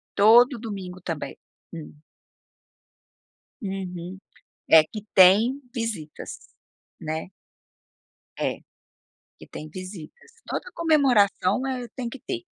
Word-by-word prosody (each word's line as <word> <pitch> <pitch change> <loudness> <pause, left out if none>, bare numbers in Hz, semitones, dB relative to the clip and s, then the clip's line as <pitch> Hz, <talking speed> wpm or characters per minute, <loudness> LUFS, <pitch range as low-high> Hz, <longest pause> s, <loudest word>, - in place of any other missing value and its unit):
Todo 235 +4 +6
domingo 190 -5 -7
também. 165 -4 -5 0.4
Hum. 150 -2 -9 1.6
Uhum, 185 -2 -5 0.5
é, 160 -1 +9
que 210 +5 -9
tem 210 +9 +6
visitas, 215 -10 -5 0.6
né. 160 +3 -4 1.1
É, - - -2 0.8
que - - -14
tem 155 - -9
visitas. 185 - -10 0.2
Toda 485 - -4
comemoração 260 - +3
é 250 -2 -3
tem 245 -3 -4
que 270 - -9
ter. 350 -2 -5
200 Hz, 95 wpm, -25 LUFS, 180-250 Hz, 1.6 s, é